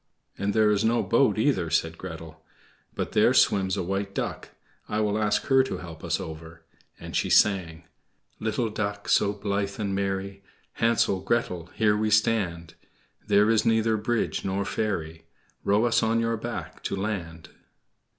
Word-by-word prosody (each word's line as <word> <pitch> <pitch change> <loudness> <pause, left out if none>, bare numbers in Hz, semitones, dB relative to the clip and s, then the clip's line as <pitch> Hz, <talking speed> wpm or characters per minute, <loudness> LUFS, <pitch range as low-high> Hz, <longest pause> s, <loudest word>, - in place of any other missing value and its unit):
"And 100 0 -2
there 110 -1 +4
is 105 0 +1
no 115 +1 +2
boat, 115 -3 +2
either," 110 - +1
said 80 0 0
Gretel; 80 -3 -9 0.5
"but - - -3
there - - +4
swims 95 -1 +3
a - - -1
white 100 +2 -3
duck - - -4 0.4
I 105 - -1
will 105 -1 +1
ask 105 -1 +1
her 135 -1 +4
to - - -4
help 85 -3 -10
us - - -1
over," 80 +1 -9 0.4
and - - -8
she - - 0
sang: 85 -5 +3 0.6
"Little 110 +1 -1
Duck 105 -1 -3
so 100 - +3
blithe 100 -1 -3
and 100 -2 -2
merry, 100 0 -3 0.3
Hansel, 115 -4 +2
Gretel, 90 -5 -1
here 105 -2 +3
we 110 +1 0
stand; 95 -7 +1 0.5
There 105 +1 +4
is 110 - +3
neither 110 0 +2
bridge 110 +2 -1
nor 95 +1 -1
ferry, 80 -7 -3 0.4
Row 105 +4 +3
us 115 0 +3
on 115 0 +1
your 115 0 0
back 120 +2 -6
to - - -1
land." 85 -5 -4
100 Hz, 160 wpm, -26 LUFS, 90-110 Hz, 0.6 s, there